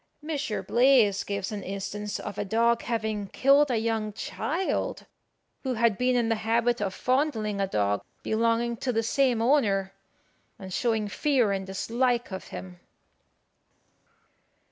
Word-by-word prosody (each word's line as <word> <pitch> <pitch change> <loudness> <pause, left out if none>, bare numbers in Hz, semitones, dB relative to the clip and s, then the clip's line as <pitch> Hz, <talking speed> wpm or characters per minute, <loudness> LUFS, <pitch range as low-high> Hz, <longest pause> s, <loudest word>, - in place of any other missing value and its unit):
Mons. 300 -5 -3 0.2
Blaze 235 -5 +4
gives 200 0 -3
an 210 -1 -4
instance 200 +2 -4
of 205 0 -6
a - - 0
dog 230 +3 +2
having 220 -3 -2
killed 275 +6 +4
a 245 - +1
young 220 -1 -1
child, 335 - -2 0.6
who 260 -2 -2
had 230 -2 +3
been 250 0 +2
in 240 -2 +2
the 225 -1 +1
habit 235 +1 +1
of 195 -2 -2
fondling 240 -7 0
a 195 - +1
dog 100 - 0 0.2
belonging 230 +1 +1
to 255 - -1
the 225 -1 0
same 245 -1 +2
owner, 205 -8 +2 0.6
and 190 -1 -8
showing 225 -2 0
fear 250 0 +1
and 195 -1 -2
dislike 235 +4 0
of 190 - -6
him. 90 0 -9
225 Hz, 145 wpm, -27 LUFS, 200-245 Hz, 0.6 s, Blaze